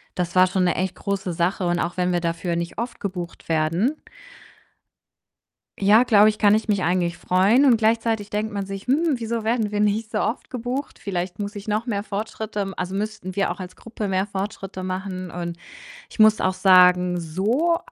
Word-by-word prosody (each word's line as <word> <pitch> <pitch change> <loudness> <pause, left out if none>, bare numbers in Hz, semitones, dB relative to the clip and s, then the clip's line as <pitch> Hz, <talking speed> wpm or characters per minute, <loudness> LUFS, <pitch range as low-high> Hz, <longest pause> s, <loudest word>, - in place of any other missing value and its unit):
das 175 -1 -3
war 185 0 +6
schon 185 0 0
'ne 175 - +1
echt 185 0 -2
große 195 -3 -3
Sache. 180 +3 0
Und 175 0 0
auch 175 +1 -2
wenn 180 0 +1
wir 175 - +2
dafür 170 0 -2
nicht 170 0 -4
oft 235 +3 -4
gebucht 180 -5 -6
werden 165 - +1 1.9
ja, 210 +4 +6
glaube 215 -3 +6
ich, 215 - -3
kann 205 -1 +4
ich 220 +2 +1
mich 200 -3 +1
eigentlich 175 0 0
freuen 200 +9 +3
und 250 -4 +5
gleichzeitig 225 -1 0
denkt 215 +1 -2
man 200 -1 -3
sich: 195 +2 -7
„Hm, 300 +3 +2
wieso 230 -1 -3
werden 220 -1 0
wir 205 - -2
nicht 210 +2 0
so 215 - -1
oft 230 - -2
gebucht? 250 +3 -4
Vielleicht 180 -1 -4
muss 205 +1 -4
ich 205 +1 -8
noch 215 +2 -1
mehr 205 -5 -2
Fortschritte 215 +1 -5
m 195 -1 -4
also, 180 +1 -4
müssten 195 -2 -4
wir 195 -3 +1
auch 175 - -7
als 185 -1 -8
Gruppe 220 -2 -6
mehr 190 +1 0
Fortschritte 195 -1 -5
machen.“ 185 -1 -4
Und 170 0 -5 0.5
ich - - -15
muss 215 0 +6
auch 185 0 +1
sagen, 180 -1 +5
so 220 - 0
195 Hz, 200 wpm, -23 LUFS, 180-215 Hz, 1.9 s, war